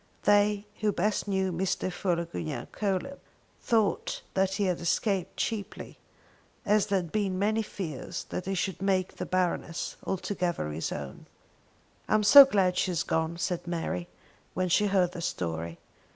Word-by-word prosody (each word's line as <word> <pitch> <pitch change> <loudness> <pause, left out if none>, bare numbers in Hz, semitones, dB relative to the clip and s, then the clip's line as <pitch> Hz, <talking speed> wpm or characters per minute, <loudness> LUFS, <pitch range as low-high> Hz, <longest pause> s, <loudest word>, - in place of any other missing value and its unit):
They 205 0 +3
who 210 0 +2
best 205 +3 0
knew 190 -1 0
Mr. 185 +1 -1
Philogunac 170 -4 -3
Coelebs 205 +7 -2 0.4
thought 220 -4 0
that 190 0 +1
he 205 - 0
had 180 -3 0
escaped 185 +2 0
cheaply, 215 -3 -4 0.7
as 210 0 +3
there 200 -1 +2
had 175 -4 -4
been 195 -3 0
many 215 +3 +1
fears 175 -9 -5
that 180 - -4
he 195 - -1
should 185 0 -2
make 190 -2 0
the - - -4
Baroness 180 -2 -1
altogether 175 - -2
his 80 +2 -3
own. 70 -2 -7 0.8
"I - - +4
am 215 - +3
so 280 +6 +11
glad 190 -8 +1
she - - +1
has 175 -3 0
gone," 160 +1 -1
said 175 0 -2
Mary, 165 - -3 0.5
when 185 +1 0
she 205 +4 +3
heard 185 -3 +2
the 175 - -7
story. 85 - -3
185 Hz, 155 wpm, -28 LUFS, 170-205 Hz, 0.8 s, so